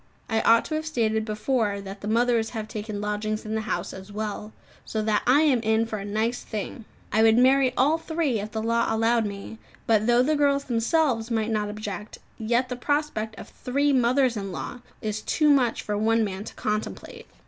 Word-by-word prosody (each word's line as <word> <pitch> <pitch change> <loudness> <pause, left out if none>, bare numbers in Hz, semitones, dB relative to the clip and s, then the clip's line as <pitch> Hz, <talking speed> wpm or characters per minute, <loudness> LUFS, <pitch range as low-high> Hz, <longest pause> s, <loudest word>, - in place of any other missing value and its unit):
I 225 -1 +1
ought 230 0 +5
to - - -5
have 310 0 -2
stated 220 -6 0
before 215 -1 0
that 195 0 -8
the 205 - -5
mothers 230 0 +2
have 215 -1 -4
taken 215 -1 -5
lodgings 210 +1 -2
in 215 - -4
the 220 - 0
house 180 -3 -3
as 190 +2 -10
well, 210 0 -4 0.3
so 215 -1 -3
that 215 -1 +1
I 270 +4 +6
am 285 -6 +4
in 220 0 +2
for 220 -2 -4
a 200 - -6
nice 220 +4 -1
thing! 215 +1 -6 0.3
I 220 - +3
would 225 0 +5
marry 260 +1 +5
all 300 +5 +3
three 320 -8 -1
if 210 +2 -5
the 220 0 -3
law 230 +1 +1
allowed 225 0 +2
me; 200 +2 -8 0.3
but 220 -1 +2
though 240 +1 +5
the 305 +4 +2
girls 280 -1 +2
themselves 235 0 +1
might 225 -1 0
not 210 -1 0
object, 210 -1 -6 0.2
yet 235 +3 +1
the 250 - -4
prospect 250 -5 -1
of - - -10
three 280 +3 0
mothers 255 0 +3
in 195 -2 -4
law 180 +8 -6 0.2
is 215 0 -2
too 300 +5 +2
much 255 -5 +2
for 210 - -2
one 225 +2 +2
man 200 0 -4
to - - -9
contemplate. 210 0 -4
225 Hz, 205 wpm, -25 LUFS, 215-250 Hz, 0.3 s, I